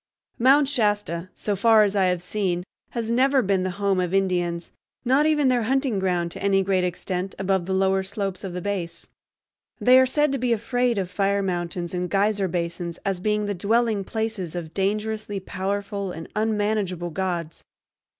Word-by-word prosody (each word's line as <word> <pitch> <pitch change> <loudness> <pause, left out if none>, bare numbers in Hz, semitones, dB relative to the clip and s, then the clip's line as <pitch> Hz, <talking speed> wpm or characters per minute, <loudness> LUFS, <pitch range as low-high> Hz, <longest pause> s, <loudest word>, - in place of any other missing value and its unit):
Mount 270 +4 +5
Shasta, 205 - 0
so 205 - -2
far 220 +2 +5
as 205 -1 0
I 195 -2 +3
have 180 -1 0
seen, 180 -2 -1 0.3
has 230 -1 -3
never 265 +2 +3
been 195 -2 +1
the 185 - -1
home 200 -2 +1
of 180 +1 0
Indians, 175 -3 0 0.3
not 270 +5 +4
even 300 -3 +3
their 250 -2 +3
hunting 260 -2 0
ground 175 -2 0
to - - -8
any 195 0 +3
great 190 -1 +1
extent, 180 +1 -3
above 190 -2 0
the 190 - -1
lower 190 0 +2
slopes 195 0 -4
of 190 -3 -5
the 180 -1 -5
base. 175 -5 -4 0.7
They 255 +1 +6
are 260 - +4
said 295 +2 +2
to 275 - -1
be 245 -1 +2
afraid 240 +1 0
of 185 -2 -2
fire 200 0 +1
mountains 175 -1 -3
and 180 0 -2
geyser 200 0 +1
basins 170 -1 -3
as 195 -2 -1
being 210 +2 0
the 205 - -1
dwelling 215 +2 +1
places 220 -5 -3
of 165 -2 -5
dangerously 210 +1 -2
powerful 200 +1 -3
and 165 -1 -7
unmanageable 210 -5 0
gods. 170 -2 -3
195 Hz, 180 wpm, -24 LUFS, 180-220 Hz, 0.7 s, They